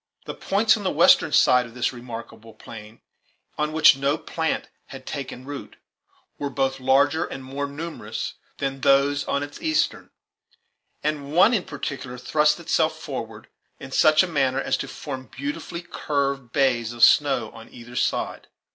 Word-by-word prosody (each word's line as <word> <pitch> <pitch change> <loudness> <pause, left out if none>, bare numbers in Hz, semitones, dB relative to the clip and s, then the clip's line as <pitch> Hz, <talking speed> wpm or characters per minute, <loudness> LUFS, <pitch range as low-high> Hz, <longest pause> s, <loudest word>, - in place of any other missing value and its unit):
The - - -5
points 215 +3 +2
on 215 - -6
the 190 - +1
western 160 0 +5
side 125 -3 +4
of 115 - -16
this 125 - -1
remarkable 115 -2 -10
plain, 110 0 -12 0.5
on 150 0 -1
which 155 -3 +6
no 140 +2 0
plant 160 0 -3 0.2
had 135 -1 -11
taken 130 -3 -6
root, 145 0 -8 0.6
were 140 - -2
both 135 -1 -1
larger 140 +5 +3
and 135 - -7
more 140 +2 -4
numerous 155 +4 -6 0.2
than 135 -1 -3
those 140 +1 +3
on 140 - -1
its 145 0 -9
eastern, 315 -1 0 0.9
and 145 -2 -2
one 190 +8 +6
in 205 -6 0
particular 135 -4 -6
thrust 150 +5 +2
itself 160 -1 0
forward - - -7 0.3
in 135 - -10
such 155 +4 +5
a - - -2
manner 135 -5 +1
as - - 0
to 135 - -5
form 130 0 -7
beautifully 280 -11 -5
curved 140 -6 -2
bays 120 -4 +1
of 120 - -1
snow 135 -7 +4
on 115 0 -13
either 120 0 -12
side. - - -1
140 Hz, 160 wpm, -24 LUFS, 130-155 Hz, 0.9 s, which